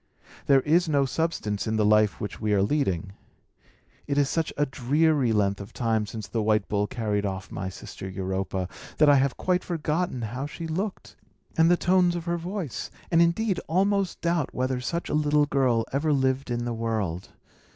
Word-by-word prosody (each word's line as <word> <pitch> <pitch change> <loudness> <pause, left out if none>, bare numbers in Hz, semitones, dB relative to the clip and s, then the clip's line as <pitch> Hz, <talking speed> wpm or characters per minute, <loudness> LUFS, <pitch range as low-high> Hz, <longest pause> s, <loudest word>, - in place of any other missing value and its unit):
There 135 -2 +6
is 165 +4 +2
no 140 -2 +3
substance 125 -9 -2
in 110 - 0
the 110 -1 +2
life 105 0 +3
which 105 - -6
we 105 -1 +1
are 95 - +3
leading. 100 - 0 0.9
It 140 - -1
is 145 -1 +3
such 165 -2 -1
a 145 - +3
dreary 140 0 +2
length 100 -2 +1
of 100 - -10
time 110 -3 0
since 105 -1 -6
the 115 - -2
white 110 0 +2
bull 105 0 0
carried 105 -3 -1
off 95 -1 -4
my 95 +1 -4
sister 95 0 -8
Europa, 95 -1 -3 0.3
that 150 -1 +6
I 145 - +7
have 135 -1 +1
quite 180 0 0
forgotten 160 -5 -2
how 125 +6 -4
she 165 +2 -7
looked, 185 +5 -4 0.4
and 165 +1 +5
the 175 - +5
tones 180 -1 +3
of 170 -1 -4
her 170 0 0
voice, 175 - -4 0.2
and, 165 0 +5
indeed, 180 +4 +2
almost 195 +2 +1
doubt 170 -4 0
whether 130 0 -1
such 170 +7 -3
a - - -3
little 150 -1 +3
girl 130 -5 +1
ever 150 +3 +1
lived 130 -1 +1
in 120 0 -2
the 120 - -2
world. 110 -6 -2
135 Hz, 190 wpm, -26 LUFS, 105-165 Hz, 0.9 s, I